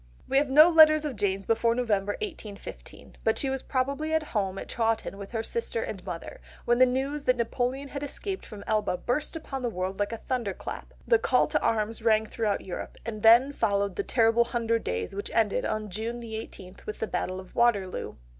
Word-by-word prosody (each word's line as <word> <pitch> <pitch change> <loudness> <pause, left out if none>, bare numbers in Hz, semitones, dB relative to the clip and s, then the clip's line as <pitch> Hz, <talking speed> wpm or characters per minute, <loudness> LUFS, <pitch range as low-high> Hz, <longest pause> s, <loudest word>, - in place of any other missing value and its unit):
We 270 - +4
have 285 -1 0
no 305 +4 +8
letters 310 -2 +7
of 285 -4 -3
Jane's 195 -1 -1
before 230 +1 +2
November 205 -5 0
1815; 205 - -8
but - - +2
she 270 - 0
was 265 -1 -2
probably 280 +4 -1
at 315 - +1
home 195 -3 0
at - - -6
Chawton 225 -3 -1
with 200 - -7
her 225 -1 -3
sister 465 - -2
and - - -6
mother, - - -7 0.2
when 240 +1 +3
the 255 - +7
news 275 +3 -2
that 255 0 +3
Napoleon 250 +4 -1
had 280 - -5
escaped 380 +7 -4
from 210 -2 -10
Elba 210 -4 0
burst 295 - -2
upon 275 -4 -5
the 245 - -1
world 190 -1 -4
like 205 +1 0
a 230 - -3
thunder 235 -5 -2
clap! - - -8
The 470 - +5
call 465 +1 +3
to - - 0
arms 225 0 0
rang 220 -1 +3
throughout 215 -2 -2
Europe, 185 - -6
and 220 -2 -5
then 240 +6 +6
followed 200 -5 0
the - - 0
terrible 230 +2 +3
Hundred 230 -1 0
Days 90 0 -3
which 200 +1 -5
ended 220 -3 +2
on 215 -2 -2
June 225 +5 -3
the 230 -2 -6
eighteenth 190 -4 -9
with 215 - -4
the - - -2
Battle 185 -3 -3
of 185 -1 -12
Waterloo. 205 -6 +1
230 Hz, 210 wpm, -27 LUFS, 205-270 Hz, 0.2 s, no